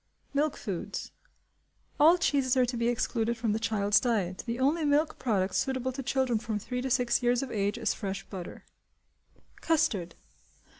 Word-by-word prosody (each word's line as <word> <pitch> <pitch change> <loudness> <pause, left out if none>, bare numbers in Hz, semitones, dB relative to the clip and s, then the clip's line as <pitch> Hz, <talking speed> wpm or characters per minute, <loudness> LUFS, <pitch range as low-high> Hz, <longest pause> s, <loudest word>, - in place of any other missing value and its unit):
Milk 290 +1 +1
Foods. 190 -6 -5 0.9
All 325 +4 +7
cheeses 275 -6 +1
are 255 - +5
to 245 +1 -3
be 235 0 0
excluded 235 -1 0
from 225 -2 0
the 220 - -1
child's 205 -2 +2
diet. 200 -7 -1
The 235 0 -2
only 300 +5 +2
milk 295 +2 +1
product 200 -6 0
suitable 260 -1 0
to 270 +2 -5
children 260 -3 0
from 215 -1 -3
three 250 +4 -4
to 265 - -3
six 245 -1 +2
years 245 +1 +2
of 265 - -6
age 205 +1 -1
is - - 0
fresh 195 -2 -4
butter. 185 -3 -8 0.9
Custard. 195 - 0
240 Hz, 165 wpm, -29 LUFS, 210-265 Hz, 0.9 s, All